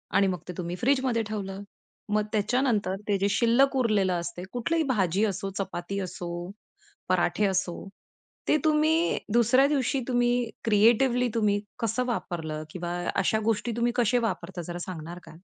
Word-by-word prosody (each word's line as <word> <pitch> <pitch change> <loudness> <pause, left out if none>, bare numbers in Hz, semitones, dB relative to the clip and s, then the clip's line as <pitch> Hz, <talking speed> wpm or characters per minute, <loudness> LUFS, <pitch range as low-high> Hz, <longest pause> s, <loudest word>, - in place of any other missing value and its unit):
आणि 195 0 +5
मग 180 -3 -1
ते 180 - -5
तुम्ही 175 0 -3
फ्रिजमध्ये 255 -3 +2
ठेवलं. 195 -2 -4 0.5
मग 210 0 +1
त्याच्यानंतर 215 -3 +1
ते 205 -1 +2
जे 200 +1 +2
शिल्लक 240 +6 +3
उरलेलं 210 -7 +2
असते 170 +1 -6
कुठलंही 320 +7 0
भाजी 200 - +1
असो, 195 -1 -2
चपाती 190 0 -3
असो, 180 -1 -5 0.8
पराठे 210 - +2
असो, 190 -3 0 0.7
ते - - +4
तुम्ही 315 +2 +3 0.2
दुसऱ्या 240 +4 +5
दिवशी 275 -2 0
तुम्ही, 245 -1 +1 0.2
क्रिएटिवली 235 +4 +4
तुम्ही, 210 -2 +2 0.2
कसं 230 +3 0
वापरलं? 160 -10 -3
किंवा 175 0 -4 0.2
अशा 195 +3 +2
गोष्टी 225 +1 0
तुम्ही 240 0 +1
कसे 245 0 +3
वापरता 185 -2 -5
जरा 175 - -4
सांगणार 170 0 -7
का? - - -13
215 Hz, 145 wpm, -27 LUFS, 185-245 Hz, 0.8 s, आणि